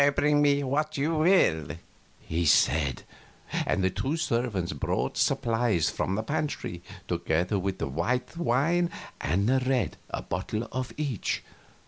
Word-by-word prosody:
"Bring 150 Hz, 0 st, +3 dB
me 145 Hz, -1 st, +3 dB
what 150 Hz, +3 st, -1 dB
you 150 Hz, +4 st, +1 dB
will," 120 Hz, -, +3 dB, 0.4 s
he 85 Hz, +2 st, -2 dB
said. 70 Hz, -3 st, +3 dB, 0.6 s
The 95 Hz, 0 st, +1 dB
two 120 Hz, -, -1 dB
servants 115 Hz, -, -1 dB
brought 70 Hz, -, -1 dB
supplies 115 Hz, -7 st, +1 dB
from 95 Hz, -, -1 dB
the 110 Hz, -, -1 dB
pantry, 140 Hz, -, -3 dB, 0.3 s
together 85 Hz, +3 st, 0 dB
with 95 Hz, 0 st, -2 dB
white 125 Hz, -, -1 dB
wine 170 Hz, +4 st, +2 dB, 0.3 s
and 95 Hz, +8 st, +1 dB, 0.2 s
red 125 Hz, -7 st, +1 dB
a -, -, -4 dB
bottle 105 Hz, +6 st, -3 dB
of 130 Hz, 0 st, -3 dB
each. 140 Hz, -, -2 dB
115 Hz, 125 wpm, -28 LUFS, 90-145 Hz, 0.6 s, Bring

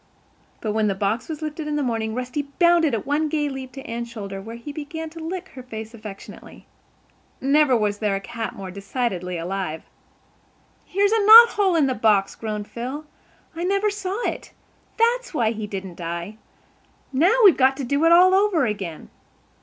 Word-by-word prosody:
But, 215 Hz, -, -2 dB
when 215 Hz, 0 st, +1 dB
the 195 Hz, -, 0 dB
box 205 Hz, +7 st, -2 dB
was 315 Hz, -1 st, -5 dB
lifted 305 Hz, 0 st, -5 dB
in 300 Hz, -, -2 dB
the 295 Hz, -, 0 dB
morning, 225 Hz, -3 st, -2 dB
Rusty 255 Hz, +3 st, -3 dB
bounded 340 Hz, -6 st, +4 dB
at 215 Hz, -, -4 dB
one 300 Hz, +2 st, 0 dB
gay 295 Hz, -1 st, 0 dB
leap 265 Hz, -1 st, -7 dB
to 270 Hz, -, -9 dB
Anne's 235 Hz, +1 st, -5 dB
shoulder 200 Hz, -4 st, -7 dB
where 225 Hz, +3 st, -8 dB
he 235 Hz, +5 st, -8 dB
began 320 Hz, +2 st, -6 dB
to 330 Hz, -, -10 dB
lick 370 Hz, +3 st, -5 dB
her 260 Hz, -, -10 dB
face 220 Hz, -2 st, -8 dB
affectionately. 210 Hz, -3 st, -11 dB, 0.7 s
Never 275 Hz, -1 st, +3 dB
was 205 Hz, -2 st, -1 dB
there 210 Hz, -2 st, 0 dB
a -, -, -2 dB
cat 225 Hz, +3 st, -6 dB
more 190 Hz, -2 st, -7 dB
decidedly 195 Hz, -3 st, -3 dB
alive. 170 Hz, -2 st, -4 dB, 1.0 s
"Here's 400 Hz, +2 st, +1 dB
a 445 Hz, -2 st, +2 dB
knot 455 Hz, +3 st, +10 dB
hole 395 Hz, -5 st, +1 dB
in 310 Hz, -4 st, +4 dB
the 260 Hz, -, 0 dB
box," 210 Hz, -4 st, +2 dB
groaned 210 Hz, -2 st, -5 dB
Phil. 260 Hz, +6 st, -6 dB, 0.5 s
"I 335 Hz, -, -4 dB
never 395 Hz, +3 st, +1 dB
saw 400 Hz, 0 st, -4 dB
it. -, -, -6 dB, 0.4 s
That's 485 Hz, -2 st, +1 dB
why 230 Hz, -5 st, +2 dB
he 215 Hz, -2 st, -5 dB
didn't 190 Hz, -3 st, -7 dB
die. 170 Hz, +5 st, -5 dB, 0.8 s
Now, 340 Hz, -, +4 dB
we've 380 Hz, -, +8 dB
got 265 Hz, 0 st, +3 dB
to 280 Hz, -, -4 dB
do 280 Hz, +5 st, 0 dB
it 330 Hz, -, +5 dB
all 365 Hz, +2 st, +7 dB
over 380 Hz, -7 st, +3 dB
again." 195 Hz, -7 st, -5 dB
255 Hz, 185 wpm, -23 LUFS, 210-325 Hz, 1.0 s, knot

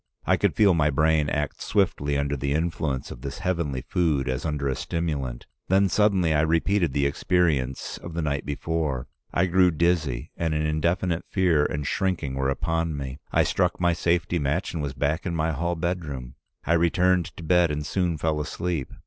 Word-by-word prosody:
I -, -, +4 dB
could -, -, +1 dB
feel 100 Hz, -3 st, +5 dB
my 75 Hz, -3 st, +3 dB
brain 75 Hz, +1 st, +2 dB
act 75 Hz, -2 st, -2 dB
swiftly 75 Hz, -8 st, +1 dB
under 70 Hz, 0 st, 0 dB
the 70 Hz, +1 st, -1 dB
influence 80 Hz, -4 st, -2 dB
of -, -, -9 dB
this 70 Hz, +1 st, -5 dB
heavenly 85 Hz, -8 st, -1 dB
food 75 Hz, -3 st, 0 dB
as 65 Hz, +3 st, -2 dB
under 75 Hz, -3 st, -1 dB
a 65 Hz, -, 0 dB
stimulant. 70 Hz, -8 st, -3 dB, 0.2 s
Then 95 Hz, +1 st, +3 dB
suddenly 95 Hz, -5 st, +3 dB
I 75 Hz, -, +3 dB
repeated 85 Hz, +2 st, +2 dB
the 70 Hz, 0 st, +1 dB
experience 70 Hz, -3 st, 0 dB
of 85 Hz, -1 st, -8 dB
the 85 Hz, -, -1 dB
night 70 Hz, -2 st, -1 dB
before. 75 Hz, -2 st, -2 dB, 0.2 s
I 85 Hz, -, +2 dB
grew 90 Hz, 0 st, +4 dB
dizzy, 80 Hz, -7 st, 0 dB
and 80 Hz, -2 st, -1 dB
an 75 Hz, 0 st, 0 dB
indefinite 85 Hz, +3 st, 0 dB
fear 90 Hz, -6 st, +3 dB
and 75 Hz, -1 st, -2 dB
shrinking 90 Hz, -5 st, -1 dB
were 65 Hz, 0 st, 0 dB
upon 80 Hz, +2 st, -1 dB
me. 70 Hz, 0 st, -6 dB
I -, -, +4 dB
struck -, -, 0 dB
my 85 Hz, -1 st, +3 dB
safety 85 Hz, +1 st, 0 dB
match 75 Hz, +6 st, -1 dB
and 80 Hz, -, -2 dB
was 70 Hz, -2 st, -3 dB
back 75 Hz, +5 st, -1 dB
in 85 Hz, -, -2 dB
my 80 Hz, 0 st, 0 dB
hall 85 Hz, +4 st, -1 dB
bedroom. 80 Hz, -8 st, -4 dB, 0.3 s
I 85 Hz, -, +2 dB
returned 90 Hz, +1 st, +3 dB
to 85 Hz, -, -8 dB
bed, 90 Hz, +1 st, +4 dB
and 75 Hz, 0 st, -3 dB
soon 85 Hz, +1 st, 0 dB
fell 75 Hz, 0 st, 0 dB
asleep. 80 Hz, -2 st, -3 dB
80 Hz, 190 wpm, -25 LUFS, 70-85 Hz, 0.3 s, feel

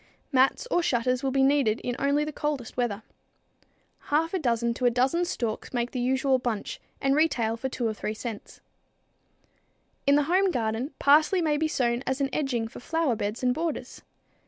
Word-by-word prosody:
Mats 265 Hz, -, +3 dB
or 350 Hz, -, +3 dB
shutters 250 Hz, -4 st, +1 dB
will 270 Hz, -, 0 dB
be 270 Hz, 0 st, +2 dB
needed 270 Hz, -5 st, +3 dB
in 245 Hz, -, -3 dB
only 285 Hz, +2 st, +2 dB
the 305 Hz, -, -4 dB
coldest 285 Hz, -6 st, -3 dB
weather. 225 Hz, -4 st, -1 dB, 1.0 s
Half 320 Hz, +4 st, +1 dB
a 375 Hz, -, 0 dB
dozen 235 Hz, -4 st, 0 dB
to 250 Hz, -, -3 dB
a -, -, +6 dB
dozen 260 Hz, +9 st, +1 dB
stalks 235 Hz, -10 st, -4 dB
make 240 Hz, -1 st, -1 dB
the 255 Hz, -, -3 dB
usual 260 Hz, +1 st, +2 dB
bunch 235 Hz, -4 st, -4 dB, 0.2 s
and 275 Hz, 0 st, +2 dB
retail 245 Hz, -8 st, +2 dB
for 265 Hz, +3 st, -4 dB
2 250 Hz, -2 st, -3 dB
or 220 Hz, -, -1 dB
3 210 Hz, -, -4 dB
cents. 220 Hz, -2 st, -7 dB, 1.5 s
In 280 Hz, -, +6 dB
the 295 Hz, -, +4 dB
home 370 Hz, +6 st, +2 dB
garden, 230 Hz, -1 st, -2 dB
parsley 305 Hz, +6 st, +4 dB
may 310 Hz, -3 st, +1 dB
be 315 Hz, +1 st, +1 dB
sown 240 Hz, -5 st, 0 dB
as 265 Hz, +1 st, -1 dB
an 275 Hz, -1 st, 0 dB
edging 250 Hz, -6 st, -1 dB
for -, -, -11 dB
flower 320 Hz, -1 st, 0 dB
beds 210 Hz, +3 st, -4 dB
and 250 Hz, -1 st, +3 dB
borders. 320 Hz, +2 st, -4 dB
260 Hz, 185 wpm, -27 LUFS, 235-295 Hz, 1.5 s, a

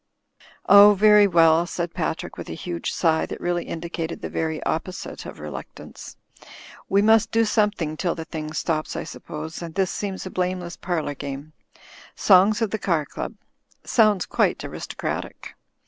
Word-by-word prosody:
"Oh, 205 Hz, 0 st, +9 dB
very 210 Hz, 0 st, +6 dB
well," 165 Hz, -1 st, +4 dB
said 170 Hz, -1 st, -4 dB
Patrick, -, -, -3 dB
with -, -, -8 dB
a -, -, -5 dB
huge 85 Hz, -1 st, -4 dB
sigh 160 Hz, -1 st, +1 dB
that -, -, -7 dB
really 175 Hz, 0 st, -1 dB
indicated 165 Hz, 0 st, -5 dB
the -, -, -6 dB
very 160 Hz, -1 st, -2 dB
opposite 180 Hz, +3 st, -4 dB
of -, -, -9 dB
reluctance. 75 Hz, -3 st, -9 dB, 0.7 s
"We 200 Hz, +1 st, +3 dB
must 220 Hz, 0 st, +4 dB
do 230 Hz, 0 st, +2 dB
something 205 Hz, -8 st, 0 dB
till 175 Hz, 0 st, -1 dB
the 160 Hz, -2 st, -6 dB
thing 155 Hz, -1 st, -6 dB
stops, 155 Hz, -2 st, -2 dB
I -, -, -3 dB
suppose, 155 Hz, +2 st, -8 dB
and 165 Hz, -2 st, -7 dB
this 190 Hz, -1 st, +1 dB
seems 195 Hz, -2 st, -4 dB
a 185 Hz, -, -6 dB
blameless 180 Hz, -1 st, -2 dB
parlour 170 Hz, -5 st, -2 dB
game. 140 Hz, +2 st, -7 dB, 0.6 s
'Songs 205 Hz, +4 st, +5 dB
of 220 Hz, -, -1 dB
the 220 Hz, -, -2 dB
Car 170 Hz, -6 st, 0 dB
Qub.' -, -, -6 dB, 0.5 s
Soimds 215 Hz, -5 st, +3 dB
quite -, -, +1 dB
aristocratic." -, -, -5 dB
175 Hz, 160 wpm, -23 LUFS, 160-200 Hz, 0.7 s, Oh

